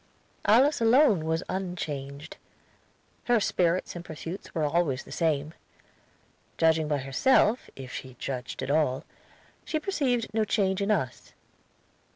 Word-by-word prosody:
Alice 255 +6 +4
alone 225 - +5
was 160 +2 0
unchanged; 155 -6 -5 0.9
her 240 -2 +4
spirits 180 -3 0
and 175 - -6
pursuits 165 +4 -8
were 160 - 0
always 150 -3 +1
the - - -14
same. 155 -2 0 1.0
Judging 160 -1 +3
by 150 -1 +1
herself, 205 - +2
if 130 -2 -9
she 130 -1 -7
judged 125 0 -5
at 130 - -2
all, 145 -4 +1 0.6
she 310 - -2
perceived 270 - -1
no 220 0 +2
change 195 -3 +1
in 200 - 0
us. 160 -12 -2
165 Hz, 130 wpm, -27 LUFS, 145-215 Hz, 1.0 s, alone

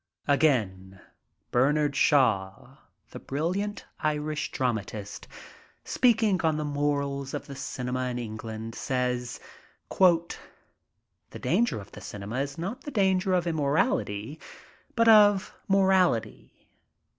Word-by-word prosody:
Again 105 -10 +1 0.5
Bernard 145 +3 +2
Shaw, 110 -10 +1 0.3
the - - -8
brilliant 185 +9 -3
Irish 155 0 -2
dramatist, 110 -5 -3 0.6
speaking 225 -6 +2
on 160 -2 +1
the 150 - -2
morals 140 -1 -2
of - - -5
the 140 - -9
Cinema 130 -1 -3
in 125 -1 -3
England, 110 -1 -6
says: 125 -1 -2 0.3
"... - - -38 1.4
The - - -10
danger 235 - +1
of 100 - -12
the - - -11
cinema 105 +4 -6
is 140 0 -3
not 195 +10 -5
the - - -7
danger 190 -5 +2
of 180 -1 0
immorality, 150 - -1 0.6
but 230 -1 +3
of 205 -2 +6
morality 190 - +1
140 Hz, 110 wpm, -27 LUFS, 120-185 Hz, 1.4 s, of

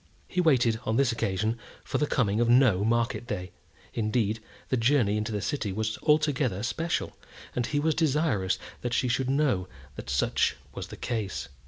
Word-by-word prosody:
He 180 - 0
waited, 125 -9 +3
on 110 +1 0
this 135 -2 +3
occasion, 110 +1 -1 0.2
for - - -2
the 150 - +1
coming 110 -6 +1
of 120 - +2
no 120 -6 +5
market 115 +1 0
day; 90 -4 -4 0.4
indeed, 110 -1 0 0.3
the - - +2
journey 115 -3 +3
into 105 +1 -2
the 105 -1 -2
city 135 -9 -2
was 110 +2 -2
altogether 145 -9 +2
special, 160 +8 -2 0.4
and 120 -1 0
he 145 - 0
was 160 +2 +2
desirous 145 - +1 0.2
that 120 -1 -1
she 130 - +2
should 130 +1 0
know 135 -10 +1 0.3
that - - -7
such 70 0 +1 0.2
was - - -6
the - - -10
case. 110 - -3
120 Hz, 175 wpm, -28 LUFS, 105-135 Hz, 0.4 s, no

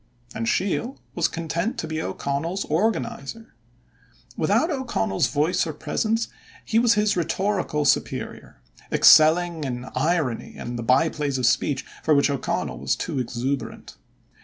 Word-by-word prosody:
And 115 - -3
Sheil 230 +7 -1 0.2
was 170 -1 +1
content 170 +9 -3
to - - -3
be 160 0 -3
O'Connell's 160 +7 -3
organizer. 225 +6 -2 0.8
Without 330 - +2
O'Connell's 235 - 0
voice 165 +4 +1
or 160 - -4
presence, 220 +10 -1 0.4
he 225 - +2
was 235 -1 +4
his 210 0 +2
rhetorical 175 -2 -1
superior, 140 - -1 0.3
excelling 165 +1 +6
in 125 -2 -4
irony 145 -3 -1
and 120 0 -5
the - - -2
by 130 +8 +3
plays 145 -4 -2
of 130 - 0
speech 135 +3 +1 0.2
for 155 - +4
which 140 0 +3
O'Connell 140 - -2
was - - 0
too 135 - -3
exuberant. 125 +3 -4
160 Hz, 135 wpm, -24 LUFS, 140-200 Hz, 0.8 s, excelling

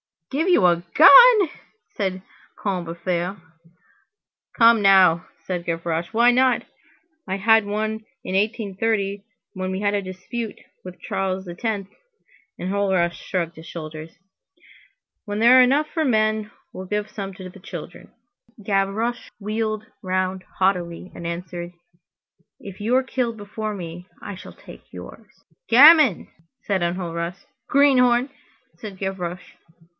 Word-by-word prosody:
"Give 310 +6 -1
you 350 - +4
a 170 -1 +3
gun!" 425 +3 +8 0.4
said 190 -2 -4 0.3
Combeferre. 175 -1 -3 1.2
"Come 230 -1 +6
now!" 185 -4 +5 0.2
said 180 -2 -4
Gavroche, 165 0 -2
"why 235 +2 +5
not? 255 0 +2 0.6
I 190 - -2
had 220 +2 +3
one 215 +1 -3 0.2
in - - -5
1830 200 -1 -1 0.3
when 185 -1 -4
we 190 +1 -4
had 205 0 +1
a 205 - 0
dispute 195 +4 -6 0.3
with 180 -1 -10
Charles 190 0 -3
X." 200 +2 -3 0.7
Enjolras 190 -2 0
shrugged 170 -2 -4
his 160 - -12
shoulders. 155 -1 -8 1.1
"When 205 -1 -4
there 240 +3 +7
are - - +9
enough 280 +5 +3
for 320 -2 0
the - - +1
men, 215 -1 +1 0.2
we - - -11
will 190 - -6
give 210 +1 -3
some 195 -3 -6
to 185 -1 -9
the 190 - -15
children." 185 - -10 0.5
Gavroche 205 +4 -1
wheeled 215 +1 -3 0.2
round 185 0 -2
haughtily, 180 -2 -1
and 170 - -7
answered:— 175 0 -6 0.9
"If 195 -2 -11
you 225 +4 0
are 260 - +3
killed 250 -3 -2
before 210 +1 -5
me, 175 -1 -8
I 205 - -7
shall 185 - -12
take - - -16
yours." - - -11 0.4
"Gamin!" 275 - +7 0.4
said 195 -3 -1
Enjolras. 170 0 -4 0.2
"Greenhorn!" 255 -2 +3 0.5
said 200 +1 -9
Gavroche. 180 -2 -5
195 Hz, 130 wpm, -22 LUFS, 180-225 Hz, 1.2 s, are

